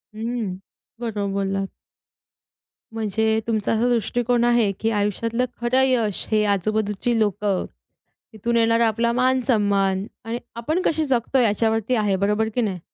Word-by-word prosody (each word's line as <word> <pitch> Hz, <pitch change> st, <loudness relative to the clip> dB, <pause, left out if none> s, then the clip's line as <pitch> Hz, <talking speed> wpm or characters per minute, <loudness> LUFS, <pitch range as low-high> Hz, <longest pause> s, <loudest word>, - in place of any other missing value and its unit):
हं. 225 Hz, -4 st, -3 dB, 0.4 s
बरोबर 210 Hz, -4 st, -3 dB
बोललात. 195 Hz, 0 st, -1 dB, 1.2 s
म्हणजे 220 Hz, 0 st, 0 dB
तुमचा 220 Hz, -3 st, 0 dB
असा 225 Hz, +2 st, +1 dB
दृष्टिकोन 240 Hz, +1 st, +1 dB
आहे, 235 Hz, -4 st, +3 dB
की 225 Hz, -, 0 dB
आयुष्यातलं 225 Hz, +4 st, 0 dB, 0.2 s
खरं 245 Hz, +2 st, +3 dB
यश 230 Hz, -6 st, 0 dB
हे 215 Hz, -1 st, +3 dB
आजूबाजूची 215 Hz, +3 st, -1 dB
लोकं, 205 Hz, -2 st, 0 dB, 0.7 s
तिथून 230 Hz, +2 st, -2 dB
येणारा 230 Hz, 0 st, +4 dB
आपला 235 Hz, +2 st, +1 dB
मान-सन्मान 210 Hz, -7 st, +1 dB, 0.2 s
आणि 230 Hz, +2 st, -3 dB, 0.2 s
आपण 310 Hz, +10 st, -1 dB
कसे 315 Hz, -3 st, +1 dB
जगतोय 255 Hz, -1 st, +1 dB
याच्यावरती 225 Hz, +2 st, +1 dB
आहे 205 Hz, -4 st, +1 dB
बरोबर 210 Hz, +3 st, +1 dB
की 250 Hz, -, +1 dB
नाही. 190 Hz, -6 st, -2 dB
220 Hz, 130 wpm, -23 LUFS, 205-240 Hz, 1.2 s, येणारा